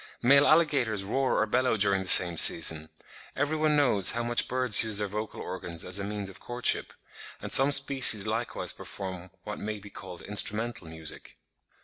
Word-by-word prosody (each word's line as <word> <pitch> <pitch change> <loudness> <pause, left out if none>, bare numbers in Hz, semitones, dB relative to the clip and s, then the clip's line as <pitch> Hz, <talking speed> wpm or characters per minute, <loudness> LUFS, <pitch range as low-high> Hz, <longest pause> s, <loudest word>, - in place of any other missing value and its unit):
Male 140 +4 +3
alligators 140 -10 0
roar 130 +7 -2
or - - 0
bellow 125 +1 -1
during 100 -1 0
the 95 - -6
same 90 -2 +8
season. 80 -1 +4 0.5
Every 150 +2 -3
one 155 -1 -1
knows 115 -10 +2
how 120 +1 -4
much 120 0 -1
birds 125 -3 +3
use 110 -2 -1
their 105 0 -2
vocal 105 +2 -8
organs 90 -3 -5
as 90 +2 0
a - - -5
means 100 0 -7
of 95 0 -13
courtship; 120 0 -3 0.5
and - - -10
some 135 +2 +6
species 135 -7 +2
likewise 110 +2 -4
perform 95 -2 -10
what - - -8
may 105 0 -6
be 100 0 -15
called 90 -2 -12
instrumental 105 -1 -3
music. 80 -1 -9
105 Hz, 175 wpm, -26 LUFS, 95-125 Hz, 0.5 s, same